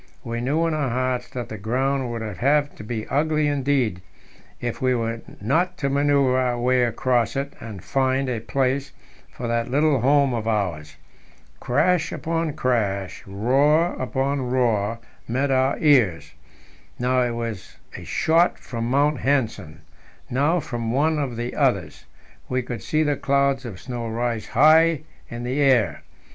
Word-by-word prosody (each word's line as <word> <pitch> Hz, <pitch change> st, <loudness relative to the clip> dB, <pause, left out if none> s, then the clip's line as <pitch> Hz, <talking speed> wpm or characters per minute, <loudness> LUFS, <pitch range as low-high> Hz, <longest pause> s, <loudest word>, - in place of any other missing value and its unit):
We 115 Hz, 0 st, -4 dB
knew 150 Hz, +7 st, +1 dB
in 165 Hz, -, 0 dB
our 145 Hz, -4 st, 0 dB
hearts 125 Hz, 0 st, -1 dB
that 125 Hz, -2 st, -6 dB
the 110 Hz, -, -7 dB
ground 130 Hz, +4 st, -1 dB
would 115 Hz, -1 st, -4 dB
have 140 Hz, +8 st, +1 dB
to -, -, -11 dB
be 110 Hz, 0 st, -4 dB
ugly 155 Hz, +1 st, +1 dB
indeed 135 Hz, -9 st, 0 dB, 0.6 s
if 120 Hz, -1 st, -4 dB
we 130 Hz, -1 st, +2 dB
were 115 Hz, -1 st, -2 dB, 0.2 s
not 175 Hz, -, 0 dB
to 140 Hz, -, -1 dB
manoeuvre 140 Hz, -2 st, +3 dB
our 125 Hz, -1 st, 0 dB
way 125 Hz, +1 st, +2 dB
across 120 Hz, +1 st, 0 dB
it 140 Hz, +1 st, -3 dB
and 105 Hz, -6 st, -9 dB
find 135 Hz, 0 st, 0 dB
a 125 Hz, -3 st, -2 dB
place 130 Hz, +4 st, -1 dB, 0.4 s
for 120 Hz, -, -6 dB
that 115 Hz, 0 st, -1 dB
little 145 Hz, 0 st, +2 dB
home 140 Hz, 0 st, +3 dB
of 115 Hz, -2 st, -3 dB
ours. 85 Hz, -9 st, -2 dB, 0.6 s
Crash 155 Hz, +5 st, +1 dB
upon 165 Hz, -1 st, -2 dB
crash, 100 Hz, -8 st, -1 dB
roar 140 Hz, -, +2 dB
upon 135 Hz, +2 st, -1 dB
roar, 115 Hz, -4 st, +1 dB, 0.3 s
met 135 Hz, +4 st, 0 dB
our 130 Hz, +1 st, +2 dB
ears. 125 Hz, -, +3 dB, 0.7 s
Now 125 Hz, +1 st, +1 dB
it 120 Hz, -1 st, 0 dB
was 115 Hz, -4 st, -6 dB, 0.2 s
a -, -, -8 dB
shot 165 Hz, +2 st, +2 dB
from 115 Hz, -2 st, -5 dB
Mount 145 Hz, +1 st, +1 dB
Nansen, 110 Hz, -, -1 dB, 0.5 s
now 145 Hz, +8 st, +2 dB
from 120 Hz, -6 st, -4 dB
one 150 Hz, +4 st, +1 dB
of 135 Hz, -5 st, -2 dB
the 120 Hz, +1 st, -4 dB
others; 100 Hz, -, 0 dB, 0.4 s
we 130 Hz, 0 st, 0 dB
could 120 Hz, -3 st, -6 dB
see 155 Hz, +8 st, 0 dB
the 145 Hz, -1 st, +1 dB
clouds 140 Hz, -1 st, +1 dB
of 100 Hz, -6 st, -7 dB
snow 120 Hz, -2 st, -5 dB
rise 115 Hz, 0 st, -2 dB
high 155 Hz, +3 st, +5 dB, 0.3 s
into 120 Hz, 0 st, -6 dB
the 130 Hz, +3 st, -1 dB
air. 120 Hz, -, +3 dB
130 Hz, 155 wpm, -23 LUFS, 115-140 Hz, 0.7 s, high